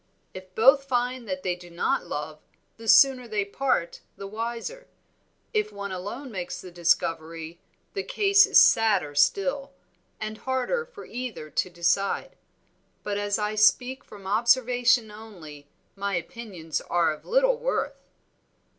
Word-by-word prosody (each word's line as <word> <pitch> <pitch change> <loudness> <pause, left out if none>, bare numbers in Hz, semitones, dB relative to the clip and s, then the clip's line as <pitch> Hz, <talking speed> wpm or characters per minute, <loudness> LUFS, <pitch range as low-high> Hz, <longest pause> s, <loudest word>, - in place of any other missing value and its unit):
If 185 0 -11
both 270 +5 +5
find 250 -2 -1
that 185 -1 -4
they 180 -1 0
do 175 0 -14
not 170 0 -1
love, 150 +1 -5 0.4
the 225 0 -11
sooner 255 +1 +6
they 210 -3 -1
part 200 -5 -1 0.2
the 200 - -7
wiser; 235 - -5 0.7
if 425 -1 0
one 200 -1 -6
alone 205 +9 -6
makes 180 -2 -5
the 180 - -10
discovery 165 -1 -1 0.3
the 395 - -2
case 400 0 +4
is - - +4
sadder 215 -10 +4
still, 270 - +1 0.5
and 215 0 -5
harder 260 - -1
for 425 -4 -12
either 235 -11 -6
to - - -1
decide. 180 - 0 0.7
But 205 -1 -2
as 205 0 0
I 210 0 -2
speak 250 +5 +3
from 200 -2 -14
observation 240 +2 +3
only 175 -10 -12 0.3
my 200 -1 -2
opinions 175 -3 -5
are 170 -2 +2
of 150 - -13
little - - +2
worth." - - -3
215 Hz, 140 wpm, -26 LUFS, 180-255 Hz, 0.7 s, sooner